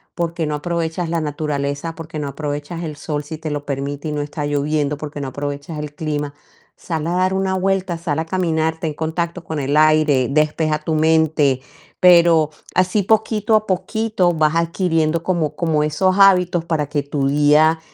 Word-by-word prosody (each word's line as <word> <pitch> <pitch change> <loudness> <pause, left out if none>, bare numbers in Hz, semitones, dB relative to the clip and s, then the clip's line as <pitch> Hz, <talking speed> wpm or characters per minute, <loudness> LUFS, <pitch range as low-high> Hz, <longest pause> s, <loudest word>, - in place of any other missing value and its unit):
¿por 170 -1 -2
qué 165 -3 -1
no 150 - -2
aprovechas 170 +1 -2
la 165 -1 -1
naturaleza? 145 +1 -3
¿Por 165 -1 -8
qué 155 -2 -6
no 145 - -3
aprovechas 150 +4 -5
el 155 -2 -5
sol 150 -1 -3
si 155 +2 -7
te 160 -1 -4
lo 145 0 -4
permite 140 +2 -4
y - - -3
no 145 - -2
está 145 0 -4
lloviendo? 145 0 0
¿Por 150 0 -6
qué 145 - -6
no 135 - -3
aprovechas 145 +3 -5
el 150 -1 -6
clima?, 150 -2 -3 0.4
sal 160 -2 -4
a - - -1
dar 185 +1 +1
una 190 0 0
vuelta, 190 -2 0
sal 160 -2 -2
a 160 - -2
caminar, 160 -2 0
ten 155 -3 -2
contacto 170 +2 -3
con 160 -3 -4
el 140 +2 -1
aire, 155 -4 +4
despeja 155 +1 +1
tu 155 0 -1
mente, 155 -4 +2 0.4
pero 170 -3 +6 0.3
así 185 +3 +2
poquito 220 +1 +2
a 215 0 +1
poquito 195 -1 0
vas 155 -1 +1
adquiriendo 165 -1 +1
como 160 -5 -1
como 160 -3 +1
esos 185 +5 +1
hábitos 180 -3 +5
para 155 -4 -1
que 145 -1 -1
tu 140 -1 -1
día 150 +3 +4
160 Hz, 190 wpm, -19 LUFS, 150-170 Hz, 0.4 s, pero